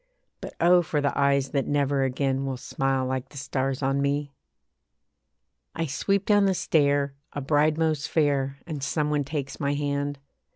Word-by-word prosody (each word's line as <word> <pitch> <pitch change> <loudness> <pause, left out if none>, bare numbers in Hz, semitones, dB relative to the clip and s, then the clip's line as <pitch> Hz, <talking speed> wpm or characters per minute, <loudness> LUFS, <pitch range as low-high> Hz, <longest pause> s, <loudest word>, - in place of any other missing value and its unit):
But - - -8
oh! 175 +1 +6
for 155 -3 -1
the 145 -1 0
eyes 140 -1 +2
that 140 -1 -1
never 140 -1 +1
again 135 +1 0
Will 135 -1 -3
smile 135 +1 -1
like 130 0 -3
the 140 - -13
stars 135 0 -2
on 135 +1 +1
me. 140 0 -1 1.4
I 165 - -1
sweep 195 +8 0
down 205 -1 +4
the 190 - +2
stair, 145 -4 +2 0.2
a - - -3
bride 150 +2 +2
most 160 -1 0
fair, 140 -4 +1
And 155 -4 -5
some 150 +2 -1
one 145 -1 +1
takes 140 -1 -4
my 145 -1 0
hand. 145 0 -2
140 Hz, 170 wpm, -26 LUFS, 135-150 Hz, 1.4 s, oh